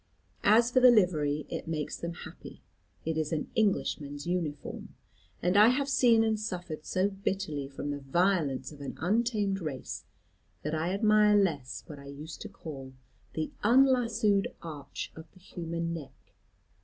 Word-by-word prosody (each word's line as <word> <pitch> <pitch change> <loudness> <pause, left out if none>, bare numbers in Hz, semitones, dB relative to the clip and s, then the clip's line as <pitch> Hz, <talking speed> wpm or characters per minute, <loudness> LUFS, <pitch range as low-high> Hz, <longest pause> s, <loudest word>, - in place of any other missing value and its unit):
As 230 +3 +5
for 255 - +5
the 250 0 +8
livery, 155 -9 +3
it - - -5
makes 155 -2 -2
them 170 0 -5
happy: - - -11 0.4
it 160 0 0
is 155 -1 -1
an 155 -2 -2
Englishman's 145 -9 0
uniform. 170 -5 -3 0.5
And 180 +2 +2
I 210 +2 +8
have 270 +3 +2
seen 245 -4 +5
and 220 -1 +1
suffered 175 -7 -5
so 185 +2 +2
bitterly 190 -7 -2
from 140 +1 -5
the 145 - -3
violence 145 -2 +1
of 145 -1 -12
an 140 - -6
untamed 205 0 +1
race, 150 -5 -5 0.6
that 150 - -2
I 160 +3 0
admire 210 +1 +5
less 150 -10 0
what 145 -2 -9
I 140 - -11
used 145 +3 -8
to 215 - -6
call 140 -9 -9 0.4
the 155 -1 -2
unlassoed 230 -4 +4 0.2
arch 150 -4 -6
of 160 0 -11
the 185 - -18
human 170 -2 -4
neck. 140 -5 -10
170 Hz, 155 wpm, -30 LUFS, 150-210 Hz, 0.6 s, the